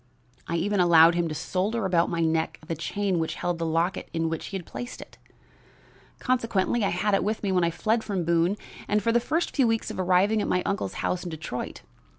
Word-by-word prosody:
I 170 - -2
even 200 +4 0
allowed 170 -1 +7
him 170 0 0
to 155 - -4
solder 200 +7 -1
about 175 -2 +2
my 170 -1 -1
neck 160 0 0
the 165 - -3
chain 190 +3 -1
which 160 - -2
held 175 -1 -2
the 165 - -1
locket 165 +3 -1
in 165 -1 0
which 165 -1 -4
he 195 - -4
had 180 - -9
placed 245 0 -7
it. - - -12 1.0
Consequently 230 -3 0
I 200 - +2
had 200 +4 0
it 195 - +3
with 215 +2 -2
me 200 - 0
when 180 -2 +2
I 170 - +3
fled 220 +6 0
from 195 -5 -2
Boone, 170 +4 +2 0.3
and 210 0 +1
for 230 - +2
the 240 - +4
first 320 +8 -1
few 265 -5 +4
weeks 225 -1 0
after - - -3
arriving 185 +4 +3
at - - -2
my 180 - +1
uncle's 200 0 -2
house 180 -1 -1
in 180 - -5
Detroit. 155 -6 -6
185 Hz, 225 wpm, -26 LUFS, 170-210 Hz, 1.0 s, allowed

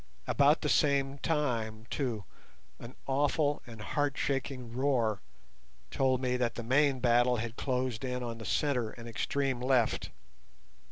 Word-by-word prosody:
About 145 +2 +4
the - - -1
same 140 -1 +2
time, 115 -9 -1
too, 120 -8 -2 0.6
an 120 +2 -10
awful 145 +2 +1
and 115 -2 -10
heartshaking 135 0 -2
roar 120 -7 +1 0.7
told 130 -1 +2
me 125 -1 0
that 120 -2 0
the 120 - -5
main 135 +2 +3
battle 120 0 +4
had 115 0 -4
closed 125 -3 -2
in 125 -1 -2
on 115 -1 -5
the - - -7
centre 125 -2 0
and 115 +1 -10
extreme 130 +4 -1
left. 125 -3 +1
125 Hz, 135 wpm, -31 LUFS, 115-140 Hz, 0.7 s, About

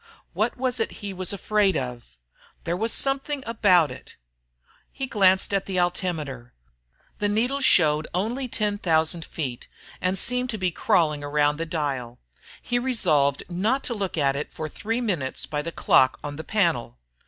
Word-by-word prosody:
What - - -1
was 250 -1 -1
it 225 - -1
he 200 - -4
was 185 -1 -2
afraid 200 -2 +1
of? 120 - -6 0.5
There 170 - -1
was 225 +5 -1
something 275 +1 +2
about 185 -8 +3
it - - -12 0.8
He 270 - -4
glanced 195 -5 +3
at 195 -1 0
the 190 -2 -2
altimeter. 160 -9 -2 0.7
The 205 - +1
needle 245 +7 +1
showed 155 - +3
only 230 +9 -2
10,000 175 -7 +1
feet, 130 -7 -5 0.3
and 185 +1 0
seemed 250 +4 +2
to 220 - -3
be 185 -2 0
crawling 155 -3 +1
around 145 0 +1
the 165 +1 -3
dial. 135 -7 -3 0.5
He 245 0 0
resolved 160 - +1
not 210 +10 0
to 240 - -3
look 195 -5 -3
at 140 -2 +2
it 145 - -4
for 155 - -5
three 225 +9 -3
minutes 170 - -2
by 150 -1 -3
the 170 - -5
clock 130 -4 +3
on 145 0 -5
the 160 - -6
panel. 170 - 0
180 Hz, 165 wpm, -25 LUFS, 150-220 Hz, 0.8 s, about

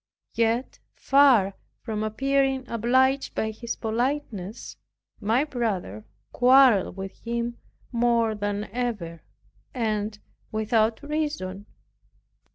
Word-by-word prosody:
Yet 230 +2 0 0.2
far 265 -9 +4 0.3
from 215 -1 -3
appearing 270 +4 0
obliged 260 +4 +1
by 220 - -1
his 230 +2 -5
politeness, 230 -3 -3 0.4
my 225 +6 +2
brother 210 - -3 0.3
quarreled 250 -7 +5
with 195 0 -7
him 235 0 -3 0.3
more 235 -2 +2
than 205 0 -2
ever, 210 -10 -3 0.5
and 215 -3 -1 0.3
without 220 +1 +1
reason. 290 -11 -3
230 Hz, 90 wpm, -25 LUFS, 210-260 Hz, 0.5 s, quarreled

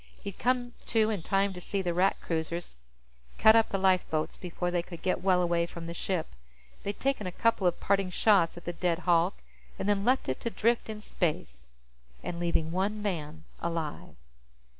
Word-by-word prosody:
He'd 200 -2 -6
come 245 0 +1 0.2
to 220 -1 +3
in 205 -5 -2
time 195 +3 +1
to 180 - -8
see 195 +2 -2
the 175 -1 0
Rat 185 +3 +2
cruisers 165 - -3 0.6
cut 220 +1 +7
up 225 -1 +4
the 195 - 0
lifeboats 185 -5 +1
before 175 0 -3
they 175 -1 +1
could 170 -1 -10
get 185 - 0
well 185 -1 +3
away 170 -1 +1
from 170 -1 -8
the 170 - -5
ship. 175 -1 -2 0.5
They'd 200 0 -4
taken 270 -7 0
a - - -3
couple 220 -1 +2
of 175 - 0
parting 195 -1 +1
shots 180 -3 +3
at 175 - -10
the 175 - -3
dead 170 -1 0
hulk, 175 +1 +3 0.4
and - - -3
then 205 -1 +2
left 255 +4 +2
it 130 - -1
to 235 - -1
drift 230 +1 +1
in 215 -1 -5
space 65 - -3 0.6
and 170 - -4
leaving 170 -2 0
one 205 +4 -1
man 160 -5 -3 0.2
alive. 165 -3 -4
180 Hz, 190 wpm, -29 LUFS, 170-205 Hz, 0.6 s, cut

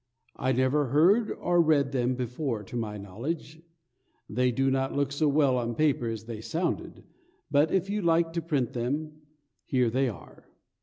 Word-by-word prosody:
I 130 - 0
never 130 +3 +2
heard 185 - +4
or 175 0 +2
read 145 -4 +3
them 125 -1 0
before 125 -2 -3
to 120 - -10
my 110 -3 -3
knowledge. 140 - -6 0.7
They 125 +3 +1
do 135 +3 +1
not 135 0 0
look 140 -1 0
so 150 +2 +1
well 140 -3 +3
on 120 -1 -3
paper 145 -5 +1
as 110 -1 -5
they 115 -2 -6
sounded; 170 +8 -3 0.5
but 145 +2 +4
if 190 0 +1
you 205 +1 -1
like 165 -1 +2
to 170 - -1
print 145 -7 -1
them, 150 +6 -3 0.4
here 125 -3 +1
they 130 +2 +1
are. 100 - -12
135 Hz, 170 wpm, -28 LUFS, 120-155 Hz, 0.7 s, heard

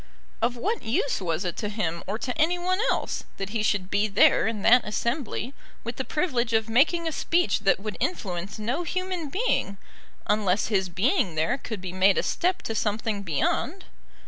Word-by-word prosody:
Of 240 +2 +1
what 430 - -1
use 240 +1 0
was 170 0 -1
it 175 - -2
to 210 - -2
him 175 -6 -2
or 205 +3 -2
to 250 +1 -3
any 330 +3 +2
one 370 +3 0
else - - -1
that 195 0 -4
he 225 -1 -1
should 200 -3 0
be 205 +1 +2
there 205 +1 +4
in 220 -3 -3
that 245 +2 +6
assembly, 235 +3 -2 0.3
with 235 0 -5
the 265 - -1
privilege 250 -7 0
of 220 0 +2
making 325 +9 +3
a - - 0
speech 345 +3 +1
that 195 -1 +2
would 210 +1 -5
influence 190 - -3
no 240 +9 -1
human 365 -2 -3
being, 370 - 0 0.5
unless 205 -2 +1
his 190 -4 +1
being 190 - +1
there 215 - +1
could 220 -7 -6
be 185 -1 -6
made 190 +1 +4
a - - +2
step 365 +1 0
to 225 - -3
something 215 -1 -1
beyond? 200 - -1
225 Hz, 190 wpm, -26 LUFS, 195-290 Hz, 0.5 s, that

